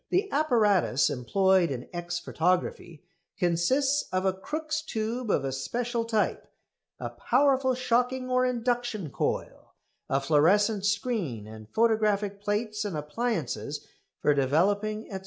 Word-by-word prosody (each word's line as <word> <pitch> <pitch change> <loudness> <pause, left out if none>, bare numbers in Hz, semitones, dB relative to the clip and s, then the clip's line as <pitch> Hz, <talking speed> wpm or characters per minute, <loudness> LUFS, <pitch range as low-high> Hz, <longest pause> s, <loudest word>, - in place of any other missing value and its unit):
The 395 +2 +1
apparatus 210 - +3
employed 185 +7 +2
in 125 -2 -5
X 175 0 -3
photography 175 -2 -1 0.3
consists 260 +12 +1
of 185 +1 0
a 190 - +2
Crookes' 310 +10 -3
tube 230 -4 -3
of 140 - +1
a 135 - -1
special 235 - -2
type, 220 -2 -1 0.5
a - - -4
powerful 260 0 +2
shocking 250 +1 0
or 255 0 +2
induction 240 - -1
coil, - - -3 0.3
a 135 - +2
fluorescent 190 +9 +3
screen 200 - -1
and 110 0 -11
photographic 210 -3 +1
plates 210 +1 -1
and 200 -7 -3
appliances 160 - -3 0.4
for 150 - +4
developing, 200 +10 +1
&c. 190 - -4
210 Hz, 125 wpm, -28 LUFS, 170-245 Hz, 0.5 s, for